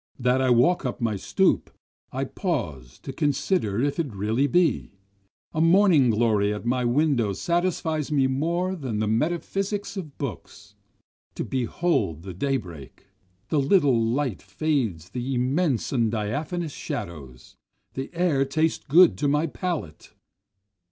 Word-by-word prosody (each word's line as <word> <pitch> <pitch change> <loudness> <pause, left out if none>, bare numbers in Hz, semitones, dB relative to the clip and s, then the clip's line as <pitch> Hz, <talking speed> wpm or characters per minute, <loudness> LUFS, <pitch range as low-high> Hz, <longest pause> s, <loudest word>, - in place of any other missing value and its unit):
That 125 +1 +2
I 130 - +2
walk 125 +9 +4
up 125 -2 -3
my 115 -3 0
stoop, 95 - +1 0.4
I 135 +2 -2
pause 100 - -4
to 135 - -6
consider 140 - 0
if 145 +3 -1
it 140 -10 -2
really 110 +8 +1
be, 175 - +1 0.6
A 155 - 0
morning 165 -6 +5
glory 105 -2 +2
at 105 +2 -5
my 125 +1 +1
window 120 -5 +2
satisfies 165 - -1
me 140 -3 +3
more 170 +8 0
than 130 - -4
the 110 - 0
metaphysics 190 - -1
of 155 -7 -7
books. 130 - -7 0.6
To - - -3
behold 125 - -1
the 95 -1 -7
day 135 +9 0
break! 85 - -11 0.4
The 155 - +2
little 140 -3 +4
light 120 -2 -1
fades 100 - -2
the 125 +3 -3
immense 130 +2 0
and 115 -4 +2
diaphanous 145 - -3
shadows, 65 -7 -7 0.4
The 135 +1 -5
air 165 -6 +2
tastes 155 +4 0
good 175 +5 +6
to 145 - +1
my 150 +3 +2
palate. 160 - -5
135 Hz, 140 wpm, -25 LUFS, 110-160 Hz, 0.6 s, good